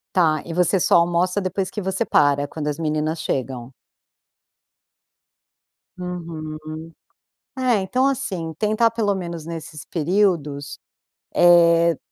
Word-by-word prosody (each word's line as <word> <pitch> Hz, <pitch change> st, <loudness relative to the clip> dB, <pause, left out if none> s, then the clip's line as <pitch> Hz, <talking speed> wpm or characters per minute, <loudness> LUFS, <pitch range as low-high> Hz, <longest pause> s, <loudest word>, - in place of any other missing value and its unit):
Tá, 155 Hz, -5 st, +3 dB
e 170 Hz, -, -7 dB
você 180 Hz, +2 st, +2 dB
só -, -, +3 dB
almoça 175 Hz, +3 st, +2 dB
depois 185 Hz, 0 st, -2 dB
que -, -, -5 dB
você 190 Hz, +3 st, -1 dB
para, 145 Hz, -7 st, +2 dB
quando 150 Hz, 0 st, -5 dB
as 150 Hz, 0 st, -3 dB
meninas 155 Hz, 0 st, -1 dB
chegam? 130 Hz, -1 st, -3 dB, 2.3 s
Uhum. 160 Hz, -3 st, -7 dB, 0.7 s
É, 255 Hz, -3 st, +2 dB
então 255 Hz, +8 st, +1 dB
assim, 210 Hz, -12 st, -2 dB
tentar 215 Hz, +2 st, +2 dB
pelo 215 Hz, -3 st, 0 dB
menos 170 Hz, -4 st, -5 dB
nesses 160 Hz, -3 st, -7 dB
períodos, 160 Hz, -5 st, 0 dB, 0.6 s
eh, 170 Hz, -2 st, +5 dB
170 Hz, 115 wpm, -22 LUFS, 155-190 Hz, 2.3 s, eh